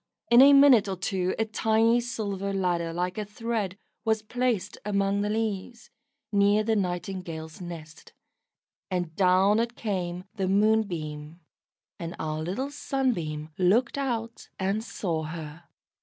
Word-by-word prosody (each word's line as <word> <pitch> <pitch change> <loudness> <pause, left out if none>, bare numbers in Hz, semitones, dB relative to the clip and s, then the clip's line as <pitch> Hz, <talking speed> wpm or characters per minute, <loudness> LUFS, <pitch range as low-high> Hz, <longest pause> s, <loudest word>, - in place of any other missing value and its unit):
In 240 +2 +9
a 280 +1 +9
minute 275 -7 +7
or 195 - -2
two 185 0 -1
a 225 - +1
tiny 225 +2 +2
silver 200 -5 -3
ladder 175 -3 0
like 180 +4 -2
a - - -1
thread 210 -2 -3 0.3
was 220 -1 +1
placed 230 -4 -1
among 200 -1 +1
the 205 - -1
leaves, 220 +1 -3 0.4
near 205 +1 +4
the 220 0 +1
Nightingale's 180 -4 -4
nest, 160 -3 -9 0.8
and 175 -4 -2
down 190 +3 +4
it 235 +1 -1
came 180 -4 -3
the 190 -2 0
Moonbeam, 175 -7 0 0.6
and 170 0 -5
our 155 0 -3
little 200 - -3
Sunbeam 175 - -2
looked 215 +7 +3
out 235 -5 -3
and 195 +3 -1
saw 170 -8 -3
her. 160 +1 -7
195 Hz, 135 wpm, -27 LUFS, 175-225 Hz, 0.8 s, In